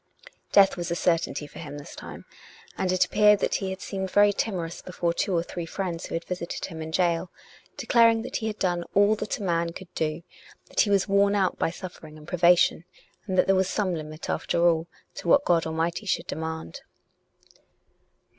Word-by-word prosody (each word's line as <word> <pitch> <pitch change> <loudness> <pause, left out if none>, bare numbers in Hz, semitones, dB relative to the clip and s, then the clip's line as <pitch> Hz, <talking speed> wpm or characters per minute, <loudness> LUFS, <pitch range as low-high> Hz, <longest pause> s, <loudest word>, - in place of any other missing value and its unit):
Death 195 -1 +5
was 175 0 -3
a 170 - -1
certainty 165 -3 0
for - - -12
him 145 -3 -7
this 145 - -10
time, - - -10 0.5
and 185 - -1
it 185 - +3
appeared 210 0 +5
that - - -1
he 190 - -2
had 190 0 -6
seemed 190 -1 -4
very 205 +1 +5
tim 205 0 -1
orous 170 -1 -5
before 175 -2 -2
two 185 +2 -1
or 165 - +1
three 175 -1 -6
friends 175 -2 -4
who - - -4
had 165 - -4
visited 180 -2 -4
him 160 -3 -8
in 160 - -5
gaol, 170 +1 +1 0.5
declaring 230 -1 +4
that - - -3
he 220 - -3
had 215 -1 -4
done 175 -2 0
all 205 +1 +5
that 215 0 -3
a - - -7
man 170 -2 0
could 180 0 -11
do, 155 +1 -2 0.5
that - - -4
he 210 - +4
was 200 -2 +3
being 200 -1 +1
worn 200 0 +3
out 190 -2 +1
by - - +1
suffering 165 -3 -10
and 150 0 -14
privation, 175 -1 +4 0.4
and 185 -2 -2
that - - +5
there 195 - +3
was 190 0 +2
some 195 -4 0
limit, 155 0 -6
after 170 0 +1
all, 165 -1 +2 0.3
to - - -8
what 285 +11 +5
God 165 -2 +2
Almighty 165 +6 -2
should 190 - 0
demand. 160 - -5
175 Hz, 210 wpm, -26 LUFS, 165-195 Hz, 0.5 s, Death